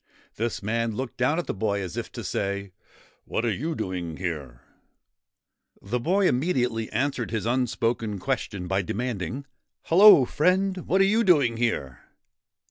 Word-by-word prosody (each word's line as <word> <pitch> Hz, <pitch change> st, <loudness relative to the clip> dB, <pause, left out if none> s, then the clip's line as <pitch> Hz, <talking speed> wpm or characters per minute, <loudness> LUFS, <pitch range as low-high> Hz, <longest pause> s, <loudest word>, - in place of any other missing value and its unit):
This 115 Hz, -2 st, -3 dB
man 115 Hz, +1 st, -1 dB
looked 130 Hz, +1 st, -5 dB
down 130 Hz, +5 st, +1 dB
at 175 Hz, -, -1 dB
the -, -, -3 dB
boy 100 Hz, 0 st, -1 dB
as 90 Hz, -3 st, -5 dB
if -, -, -5 dB
to -, -, -6 dB
say, 100 Hz, 0 st, -3 dB, 0.3 s
' -, -, -30 dB
What 115 Hz, -, -2 dB
are 115 Hz, -, +1 dB
you 155 Hz, -, -3 dB
doing 90 Hz, -, -4 dB
here? 75 Hz, -10 st, -5 dB, 0.7 s
' -, -, -41 dB
The 125 Hz, -, +2 dB
boy 185 Hz, +9 st, +2 dB
immediately 125 Hz, -6 st, 0 dB
answered 135 Hz, -4 st, -1 dB
his 110 Hz, -1 st, -3 dB
unspoken 115 Hz, -3 st, 0 dB
question 100 Hz, -5 st, -3 dB
by 95 Hz, +1 st, +1 dB
demanding, 115 Hz, -, -4 dB, 0.2 s
' -, -, -59 dB
Hello, 180 Hz, -5 st, +8 dB
friend! 185 Hz, +6 st, +1 dB
What 190 Hz, +2 st, +3 dB
are -, -, +6 dB
you 220 Hz, +4 st, +3 dB
doing 145 Hz, -, +4 dB
there?' 110 Hz, -, -2 dB
120 Hz, 165 wpm, -25 LUFS, 100-145 Hz, 0.7 s, Hello